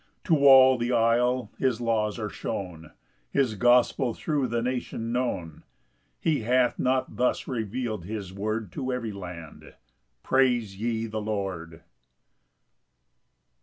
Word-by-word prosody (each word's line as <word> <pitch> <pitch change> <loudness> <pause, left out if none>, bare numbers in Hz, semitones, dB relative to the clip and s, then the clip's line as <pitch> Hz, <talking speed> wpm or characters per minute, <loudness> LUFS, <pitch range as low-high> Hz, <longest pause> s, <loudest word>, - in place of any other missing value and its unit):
6 - - -15
To 145 -4 +5
all 130 -1 +8
the 120 +1 -1
Isle 120 0 +2
his 130 -4 +1
laws 110 -2 0
are 110 -2 -3
shown, 85 -4 -6 0.4
His 135 -5 +1
gospel 120 +2 +3
thro' 145 -5 -1
the 115 0 -1
nation 120 -2 -3
known; 105 -11 -3 0.6
He 155 -4 +1
hath 125 +2 +1
not 130 0 0
thus 125 - 0
reveal'd 115 -4 -3
his 100 -2 -6
word 105 0 -3
To 130 +4 -3
every 120 -3 -3
land: 90 -5 -10 0.5
Praise 125 -6 +2
ye 115 -1 -1
the 110 -1 -4
Lord. 95 -6 -4
115 Hz, 130 wpm, -26 LUFS, 105-125 Hz, 0.6 s, all